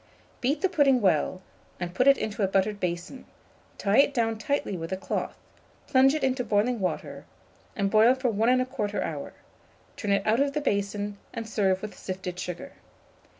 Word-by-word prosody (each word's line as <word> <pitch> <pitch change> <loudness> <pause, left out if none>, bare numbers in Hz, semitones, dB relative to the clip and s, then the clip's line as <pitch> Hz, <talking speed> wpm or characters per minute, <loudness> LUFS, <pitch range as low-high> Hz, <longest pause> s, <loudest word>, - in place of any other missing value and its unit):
Beat 280 +4 0
the - - +3
pudding 285 -8 +3
well, 185 -1 +1 0.4
and 175 -1 -4
put 255 +8 +2
it 275 - +7
into 215 -1 -3
a 195 - +3
buttered 195 +2 0
basin; 180 +8 -4 0.5
tie 200 +5 +2
it 280 0 +4
down 225 -2 0
tightly 285 -7 -1
with 165 0 -6
a 190 - -1
cloth, 190 - -3 0.5
plunge 270 +1 +4
it 310 - -2
into 260 -1 +1
boiling 225 +2 +1
water, 185 -2 -3 0.5
and 200 -1 0
boil 225 +4 +6
for 260 -2 0
1 220 +3 +2 0.2
1/4 210 -5 -3
hour; - - -5 0.6
turn 205 - -3
it 200 0 +2
out 220 +3 +3
of 280 0 +1
the 300 - -1
basin, 205 -3 -2 0.2
and 230 -1 -4
serve 195 -3 +1
with 215 - -6
sifted 185 -1 -6
sugar. 185 +10 -6
215 Hz, 180 wpm, -27 LUFS, 195-260 Hz, 0.6 s, it